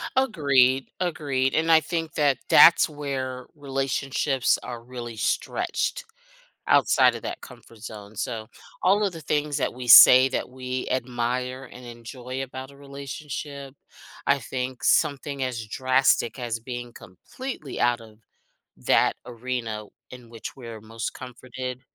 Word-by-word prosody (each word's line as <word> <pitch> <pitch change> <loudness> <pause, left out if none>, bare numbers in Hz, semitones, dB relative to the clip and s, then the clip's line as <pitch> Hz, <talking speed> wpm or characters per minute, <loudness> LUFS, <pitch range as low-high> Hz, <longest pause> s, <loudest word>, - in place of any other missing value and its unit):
Agreed, 140 - +3
agreed. 140 -7 -1
And 165 +1 +2
I 160 - +8
think 165 +1 -4
that 140 -4 +2
that's 170 - +8
where 135 -3 -5
relationships 135 -1 0
are 120 -2 -7
really 120 -2 -8
stretched - - -2 0.6
outside - - +4
of - - -7
that - - -5
comfort 115 - -14
zone. 105 -1 -10
So 110 -1 -4 0.4
all 200 +3 +4
of 190 - -2
the 165 - -8
things 150 -1 -1
that 140 - -1
we 125 0 -8
say 130 +2 +10
that 130 - -3
we 130 0 -5
admire 125 +1 -2
and 125 0 -12
enjoy 125 +2 -7
about 130 0 -8
a 140 - -17
relationship, 140 0 -7 0.5
I 140 0 +3
think 130 0 -5
something 140 -2 +1
as 120 -4 -3
drastic 130 +2 +1
as 120 -2 -3
being 120 0 -7
completely 150 - -8
out 120 -1 +2
of 110 -1 -15 0.6
that - - +2
arena 120 -3 -4 0.3
in 125 -2 -12
which 115 - -8
we're 115 -4 -9
most 115 +1 -6
comforted, 125 0 -7
130 Hz, 135 wpm, -25 LUFS, 120-140 Hz, 0.6 s, say